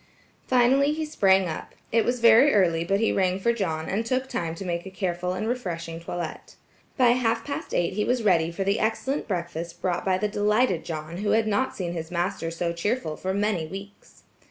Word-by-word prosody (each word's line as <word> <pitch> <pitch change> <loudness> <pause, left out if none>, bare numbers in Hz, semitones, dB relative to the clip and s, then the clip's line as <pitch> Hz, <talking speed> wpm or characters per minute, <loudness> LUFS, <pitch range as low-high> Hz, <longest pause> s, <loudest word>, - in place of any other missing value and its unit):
Finally 260 +3 +4
he 315 0 -2
sprang 190 -10 +3
up. 160 - -6 0.2
It 230 0 +3
was 245 0 -1
very 235 +4 +7
early 170 -4 +3
but 195 +3 +1
he 225 - +2
rang 185 -1 +1
for 235 +4 +2
John, 160 -8 -2
and 205 +4 -1
took 255 +3 -1
time 165 -8 -3
to 195 - -7
make 170 -1 -2
a 190 - -8
careful 180 -2 -2
and 215 +4 -3
refreshing 170 -9 -3
toilet. 170 -1 -6 0.4
By 250 -3 +5
half 240 -2 +1
past 285 - -5
eight 175 +1 0
he 210 +2 0
was 245 0 0
ready 170 -5 +3
for 180 +3 -3
the 200 +2 +1
excellent 245 +6 -1
breakfast 170 -2 -4
brought 180 -2 -1
by 190 -1 +2
the 210 +3 0
delighted 210 -2 +1
John 155 +1 -5
who 205 +2 0
had 225 0 +3
not 220 +5 0
seen 175 -3 -3
his 165 -1 -5
master 175 -1 -2
so 170 +1 -2
cheerful 170 -1 -2
for 185 - -3
many 200 -4 0
weeks. 195 +4 -11
195 Hz, 205 wpm, -25 LUFS, 170-225 Hz, 0.4 s, very